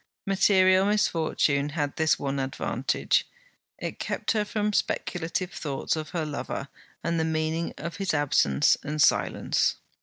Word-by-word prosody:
Material 190 -1 +4
misfortune 160 -8 +1
had 145 -2 -2
this 160 0 +2
one 140 0 -2
advantage; 135 0 0 0.5
it - - -6
kept - - -2
her 215 -2 +1
from 210 0 -1
speculative 180 -1 -1
thoughts 140 -1 -2
of 155 -1 -5
her 165 -3 -2
lover, 145 -2 -5 0.3
and 170 0 0
the - - +2
meaning 160 +1 -1
of 170 +2 -6
his 195 -2 -1
absence 135 - +3
and, 150 +1 -4
silence. - - +2
160 Hz, 140 wpm, -27 LUFS, 145-185 Hz, 0.5 s, Material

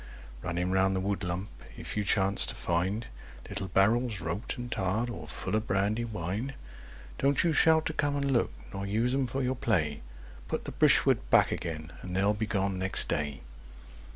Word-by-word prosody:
Running 90 +1 -1
round 95 0 +3
the - - +1
woodlump 95 -1 -2 0.3
if - - -5
you 105 - 0
chance 100 0 +2
to - - -2
find 95 +7 -1 0.4
Little 100 -1 -4
barrels, 110 +4 +2
roped 85 +11 -4
and 120 0 -6
tarred, 110 +5 0
all 85 -9 -7
full 105 - -3
of 110 +1 -1
brandy 105 +4 +1
wine, 110 +5 -3 0.6
Don't 140 +1 +3
you 170 -2 +2
shout 160 +1 +5
to 160 - -1
come 145 -1 0
and 140 -1 0
look, 120 - +2 0.2
nor 100 0 -4
use 115 +5 +1
'em 135 -1 +1
for 135 +2 -2
your 125 +1 +1
play. 85 - 0 0.5
Put - - -3
the - - -5
brishwood - - +3
back - - +5
again—and 85 +2 -5
they'll 100 +2 +3
be 110 +1 -2
gone 95 -2 0
next 95 0 +4
day! 75 -2 -2
100 Hz, 180 wpm, -29 LUFS, 90-120 Hz, 0.6 s, shout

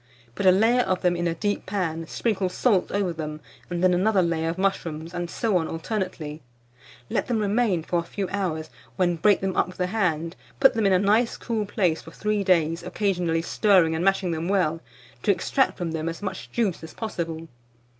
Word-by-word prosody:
Put 190 - 0
a - - +9
layer 225 +6 +4
of 185 -5 -1
them 175 -1 +3
in 175 0 -1
a 165 - -1
deep 205 +3 -2
pan, 165 -5 -2
sprinkle 200 -3 -1
salt 200 -1 +1
over 195 -3 0
them, 155 -1 -5 0.3
and 175 0 -2
then 185 -1 +5
another 190 +1 +3
layer 165 -1 0
of 170 - -3
mushrooms, 170 -4 -2
and 175 -1 -3
so 220 -2 +1
on 160 -2 -1
alternately. 165 -4 -4 0.7
Let - - 0
them 240 - 0
remain 205 -4 +1
for 175 +1 0
a - - 0
few 190 +3 -4
hours, 165 -6 -2 0.2
when 175 -2 +1
break 205 +4 +4
them 190 -1 -1
up - - +2
with 185 - -11
the 180 - 0
hand; 175 -5 -1 0.2
put - - +6
them 220 -3 +2
in 195 - +4
a - - +6
nice 210 +5 +2
cool 220 -3 -2
place 180 -6 +1
for - - -12
3 210 -1 -1
days, 165 -3 +2
occasionally 175 -5 0
stirring 185 -4 +3
and 160 +2 -1
mashing 195 -2 +2
them 165 +1 -2
well, 165 -5 +1 0.4
to - - -2
extract 265 -2 +2
from 175 -3 -3
them 160 0 -2
as 165 +4 -7
much 190 -1 -5
juice 215 -7 0
as 160 - -10
possible. 165 -7 -4
180 Hz, 205 wpm, -25 LUFS, 165-200 Hz, 0.7 s, a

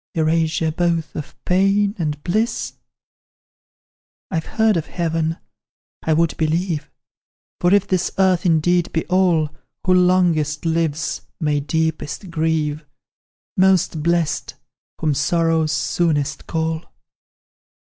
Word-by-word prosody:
Erasure 160 0 +1
both 165 -1 -1
of 150 - -6
pain 195 +2 +3
and 150 -3 -2
bliss? 215 +7 -1 1.6
"I've 160 -3 -2
heard 220 -2 +2
of 165 -2 -2
heaven 165 -1 -1 0.6
I 160 - +1
would 165 +1 +2
believe; 160 -1 -1 0.7
For 175 - +3
if 200 0 +4
this 185 -2 0
earth 185 -2 +3
indeed 175 +1 +2
be 160 - 0
all, 175 -5 +2 0.3
Who 185 - +4
longest 175 -5 +2
lives 165 -1 -1 0.2
may 150 -3 +1
deepest 160 +4 -2
grieve; 155 -2 0 0.7
Most 185 -4 +3
blest, 170 -1 0 0.4
whom 155 -2 +1
sorrows 160 +1 +1
soonest 150 -1 0
call. 160 -1 -1
165 Hz, 105 wpm, -20 LUFS, 155-180 Hz, 1.6 s, if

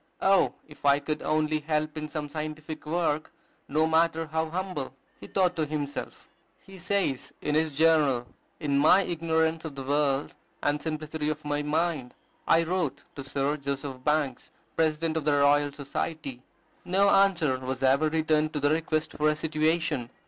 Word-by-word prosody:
"Oh, 195 0 +4
if 150 - -16
I 140 0 +5
could 150 +1 -3
only 155 0 +1
help 155 0 -1
in 155 -1 -4
some 150 -1 -4
scientific 155 0 -6
work, 155 -2 0 0.4
no 155 +3 +2
matter 160 0 +2
how 160 +1 -2
humble!" 170 -7 -4 0.2
he - - -10
thought 180 -2 +1
to 155 - +1
himself. 145 -1 -5 0.4
He 195 -1 -12
says 180 -7 -1
in 150 - -2
his 160 +1 +2
journal, 145 -4 +3 0.3
"In 140 -3 +1
my 170 +7 +6
ignorance 160 -1 0
of 155 -4 -6
the 135 - -5
world, 140 0 0 0.3
and 145 0 +1
simplicity 155 0 -3
of 155 0 -4
my 145 0 0
mind, 150 -3 -1 0.3
I 165 0 +5
wrote 160 -5 -2
to 140 - -6
Sir 140 +2 -1
Joseph 140 -2 -5
Banks, 150 -4 0 0.3
President 160 0 +1
of 155 - -2
the 150 - +3
Royal 145 0 +4
Society." 140 -1 -5 0.4
No 195 +3 +3
answer 180 -10 +3
was 130 +1 -4
ever 140 +4 +4
returned 155 -1 +1
to 150 - -1
the 145 +1 +2
request 155 0 0
for 150 0 +2
a 155 - +1
situation. 155 -4 0
155 Hz, 165 wpm, -27 LUFS, 145-160 Hz, 0.4 s, my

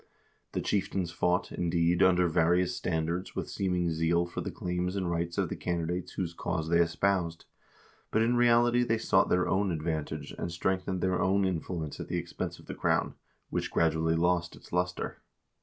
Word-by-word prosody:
The - - -1
chieftains 95 -3 -1
fought, 90 +1 0
indeed, 85 0 +1
under 90 -1 +5
various 85 +2 +2
standards 85 +1 -2
with - - -4
seeming 90 -3 0
zeal 80 +2 +2
for 85 - -5
the - - -4
claims 90 +1 -2
and 95 -2 -1
rights 85 0 -2
of - - +1
the - - -4
candidates 85 0 -2
whose 85 -3 -3
cause 80 -2 -3
they 85 0 +4
espoused, 85 0 +1 0.6
but 110 - +2
in 120 +2 +2
reality 120 0 +4
they 115 -1 +1
sought 95 -4 +3
their 90 0 +2
own 100 +1 +1
advantage, 80 -3 -3
and 85 - -3
strengthened 95 +1 -1
their 95 -1 +1
own 95 +1 +3
influence 85 -4 -3
at - - -5
the 90 - -2
expense 85 0 -4
of - - -16
the - - -6
crown, - - +1 0.4
which - - -1
gradually 80 0 +2
lost 85 0 +1
its - - -16
luster. 90 0 -2
90 Hz, 175 wpm, -30 LUFS, 85-95 Hz, 0.6 s, under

